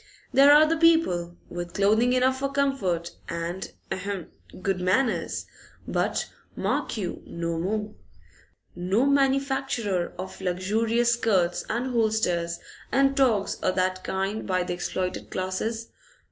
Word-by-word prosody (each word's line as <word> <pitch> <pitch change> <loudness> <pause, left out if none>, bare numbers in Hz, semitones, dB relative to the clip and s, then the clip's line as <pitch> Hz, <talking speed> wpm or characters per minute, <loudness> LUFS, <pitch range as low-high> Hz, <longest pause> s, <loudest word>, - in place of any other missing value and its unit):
There 275 +2 +7
are 300 +1 +8
the 325 +1 +1
people, 185 - +3
with 175 0 -6
clothing 220 +5 +3
enough 260 +1 +2
for 275 0 -1
comfort 245 -12 0 0.2
and 170 +2 -4 0.2
ahem! 190 -2 -4 0.3
good 195 -2 0
manners, 220 +7 +1 0.4
but, - - 0 0.3
mark - - -1
you, 185 -5 -4
no 170 -1 -3
more. 210 +4 -2 0.8
No 190 +8 +1
manufacture 270 -8 +1
of 185 +1 -7
luxurious 220 +6 +1
skirts 195 -7 +1
and 245 +3 -1
hulsters 195 -7 +1 0.3
and 275 +1 +3
togs 235 -8 +2
o' - - +2
that 185 0 0
kind 195 +3 -2
by 185 -2 +1
the 180 - -3
exploited 180 +1 -3
classes. 220 +5 -3
205 Hz, 125 wpm, -26 LUFS, 180-255 Hz, 0.8 s, are